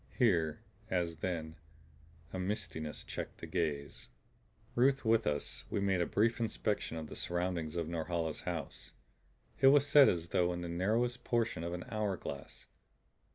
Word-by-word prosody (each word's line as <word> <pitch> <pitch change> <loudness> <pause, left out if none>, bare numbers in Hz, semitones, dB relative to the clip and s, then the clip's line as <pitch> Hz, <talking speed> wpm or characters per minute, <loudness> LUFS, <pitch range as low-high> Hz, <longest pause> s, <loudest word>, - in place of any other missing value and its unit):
Here, 85 - +3 0.3
as 85 -3 0
then, 80 -2 -3 0.8
a 95 - -3
mistiness 90 -6 -3
checked - - -6
the - - -7
gaze. 75 -7 -2 0.7
Ruth 135 +1 +3
with 115 0 +3
us, 75 -1 -2
we - - 0
made 95 -2 +2
a 85 - +1
brief 115 +3 +2
inspection 105 -6 -1
of 80 - -4
the - - -9
surroundings 85 -2 -2
of 85 -2 -1
Norhala's 80 -1 -2
house. - - -5 0.7
It 135 - +6
was 140 +1 +7
set 145 -1 +8
as 85 -1 -1
though 90 0 +2
in 85 - -4
the 85 - -4
narrowest 115 +8 0
portion 115 -8 0
of 85 +1 -3
an 90 - -6
hour 105 -4 -1
glass. - - -7
90 Hz, 155 wpm, -34 LUFS, 80-110 Hz, 0.8 s, set